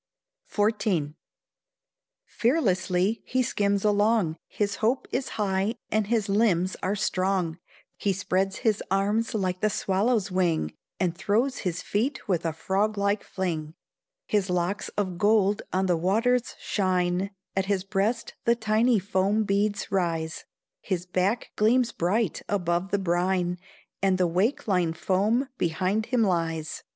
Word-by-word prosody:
XIV. 205 Hz, -8 st, +1 dB, 1.1 s
Fearlessly 200 Hz, -, +1 dB
he 255 Hz, 0 st, 0 dB
skims 200 Hz, -3 st, 0 dB
along, 205 Hz, -5 st, +3 dB
His 205 Hz, -1 st, -2 dB
hope 235 Hz, +5 st, 0 dB
is 260 Hz, +1 st, -1 dB
high, 200 Hz, +1 st, 0 dB, 0.2 s
and 215 Hz, -2 st, +1 dB
his 225 Hz, -2 st, +1 dB
limbs 195 Hz, -3 st, +2 dB
are 195 Hz, +2 st, 0 dB
strong, 185 Hz, -4 st, 0 dB, 0.4 s
He 200 Hz, -, 0 dB
spreads 190 Hz, 0 st, 0 dB
his 215 Hz, -2 st, +2 dB
arms 205 Hz, +4 st, +1 dB
like 185 Hz, -3 st, -1 dB
the 215 Hz, -, +3 dB
swallow's 200 Hz, +1 st, 0 dB
wing, 170 Hz, -, +1 dB, 0.3 s
And 175 Hz, -3 st, 0 dB
throws 230 Hz, +9 st, 0 dB
his 180 Hz, -3 st, -3 dB
feet 245 Hz, +8 st, -1 dB
with 170 Hz, -4 st, 0 dB
a -, -, 0 dB
frog 195 Hz, +6 st, -1 dB
like 200 Hz, +1 st, +1 dB
fling; 165 Hz, -4 st, -3 dB, 0.5 s
His 200 Hz, -3 st, 0 dB
locks 180 Hz, +3 st, -1 dB
of 185 Hz, -4 st, -1 dB
gold 205 Hz, -1 st, +3 dB
on 190 Hz, +1 st, +1 dB
the 175 Hz, -2 st, +2 dB
waters 230 Hz, +8 st, +1 dB
shine, 185 Hz, -1 st, 0 dB, 0.3 s
At 190 Hz, 0 st, 0 dB
his 195 Hz, -2 st, 0 dB
breast 210 Hz, +4 st, -1 dB
the 235 Hz, -, +4 dB
tiny 220 Hz, +1 st, +2 dB
foam 200 Hz, +2 st, +1 dB
beads 205 Hz, 0 st, 0 dB
rise, 165 Hz, -4 st, -1 dB, 0.3 s
His 180 Hz, -3 st, -3 dB
back 185 Hz, +6 st, 0 dB
gleams 235 Hz, +3 st, +3 dB
bright 195 Hz, +2 st, 0 dB
above 175 Hz, -2 st, 0 dB
the 200 Hz, -, +1 dB
brine, 180 Hz, -1 st, 0 dB, 0.4 s
And 190 Hz, -1 st, +3 dB
the 185 Hz, -, +3 dB
wake 190 Hz, +12 st, 0 dB
line 180 Hz, -5 st, +2 dB
foam 205 Hz, +10 st, +1 dB
behind 185 Hz, +6 st, 0 dB
him 250 Hz, -3 st, +2 dB
lies. 165 Hz, -4 st, -1 dB
195 Hz, 140 wpm, -26 LUFS, 180-215 Hz, 1.1 s, the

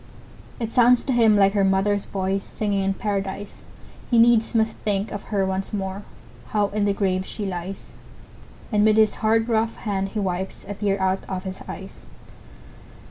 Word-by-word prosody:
It 230 Hz, -2 st, -3 dB
sounds 245 Hz, 0 st, +5 dB
to 265 Hz, -, -1 dB
him 225 Hz, -3 st, +5 dB
like 195 Hz, -1 st, +4 dB
her 200 Hz, -2 st, +2 dB
mother's 195 Hz, +1 st, +2 dB
voice, 195 Hz, 0 st, -2 dB
Singing 205 Hz, -2 st, -2 dB
in 195 Hz, 0 st, +1 dB
Paradise! 200 Hz, -1 st, -4 dB, 0.4 s
He 240 Hz, -, +3 dB
needs 230 Hz, 0 st, +4 dB
must 220 Hz, 0 st, +2 dB
think 205 Hz, 0 st, -1 dB
of 205 Hz, -, -6 dB
her 200 Hz, -3 st, 0 dB
once 190 Hz, +1 st, -3 dB
more 195 Hz, -1 st, -3 dB, 0.5 s
How 205 Hz, -2 st, +1 dB
in 205 Hz, 0 st, 0 dB
the 200 Hz, -, +2 dB
grave 185 Hz, -2 st, 0 dB
she 205 Hz, +2 st, -6 dB
lies; 185 Hz, 0 st, -6 dB, 0.8 s
And 210 Hz, -1 st, +3 dB
with 215 Hz, 0 st, +4 dB
his 220 Hz, -1 st, +4 dB
hard, 225 Hz, +1 st, +2 dB
rough 225 Hz, -1 st, +1 dB
hand 195 Hz, -2 st, -2 dB
he -, -, +1 dB
wipes 190 Hz, -1 st, -3 dB
A 205 Hz, -, -4 dB
tear 200 Hz, -1 st, -1 dB
out 190 Hz, 0 st, 0 dB
of 185 Hz, -1 st, -3 dB
his 190 Hz, -1 st, -6 dB
eyes. -, -, -9 dB
200 Hz, 180 wpm, -23 LUFS, 195-220 Hz, 0.8 s, sounds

